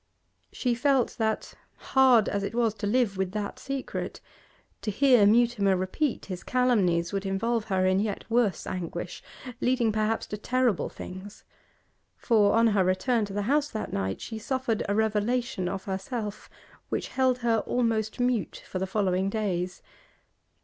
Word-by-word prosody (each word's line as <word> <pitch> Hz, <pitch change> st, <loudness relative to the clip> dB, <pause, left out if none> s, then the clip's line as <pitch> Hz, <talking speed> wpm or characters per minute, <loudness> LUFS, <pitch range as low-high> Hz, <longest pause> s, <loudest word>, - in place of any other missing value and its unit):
She 250 Hz, -2 st, 0 dB
felt 260 Hz, 0 st, +2 dB
that, 220 Hz, -1 st, -1 dB, 0.2 s
hard 255 Hz, -5 st, +4 dB
as 200 Hz, -, -1 dB
it 200 Hz, +3 st, -4 dB
was 230 Hz, -3 st, +2 dB
to 220 Hz, -1 st, -4 dB
live 220 Hz, -3 st, +1 dB
with 190 Hz, -1 st, -2 dB
that 210 Hz, -1 st, -4 dB
secret, 275 Hz, -1 st, -4 dB, 0.6 s
to -, -, -3 dB
hear 245 Hz, -1 st, +5 dB
Mutimer 220 Hz, -3 st, +3 dB
repeat 220 Hz, +9 st, -1 dB
his 185 Hz, -3 st, -6 dB
calumnies 200 Hz, -9 st, +2 dB
would 195 Hz, -1 st, -1 dB
involve 215 Hz, +4 st, -1 dB
her 190 Hz, -3 st, +1 dB
in 185 Hz, +1 st, +3 dB
yet 205 Hz, -1 st, -2 dB
worse 230 Hz, -6 st, +1 dB
anguish, 175 Hz, -1 st, -5 dB, 0.4 s
leading 245 Hz, -3 st, +2 dB
perhaps 215 Hz, +1 st, 0 dB
to 210 Hz, -, -6 dB
terrible 250 Hz, -1 st, 0 dB
things; 190 Hz, +3 st, -9 dB, 0.7 s
for, 210 Hz, -4 st, +3 dB
on 230 Hz, +1 st, +4 dB
her 205 Hz, -4 st, +3 dB
return 210 Hz, +5 st, +1 dB
to 200 Hz, -, -8 dB
the 205 Hz, 0 st, -1 dB
house 290 Hz, +6 st, +1 dB
that 215 Hz, -, -5 dB
night, 95 Hz, 0 st, -2 dB
she 220 Hz, -1 st, -6 dB
suffered 250 Hz, -1 st, -1 dB
a 200 Hz, -, +1 dB
revelation 220 Hz, -1 st, 0 dB
of 190 Hz, 0 st, -4 dB
herself, 205 Hz, +2 st, -5 dB, 0.4 s
which -, -, -2 dB
held 260 Hz, -1 st, +2 dB
her 225 Hz, -1 st, +3 dB
almost 225 Hz, -2 st, 0 dB
mute 245 Hz, -4 st, -1 dB
for 185 Hz, -, -4 dB
the 190 Hz, -, -2 dB
following 190 Hz, -1 st, 0 dB
days. 185 Hz, -4 st, -2 dB
215 Hz, 155 wpm, -27 LUFS, 195-240 Hz, 0.7 s, hear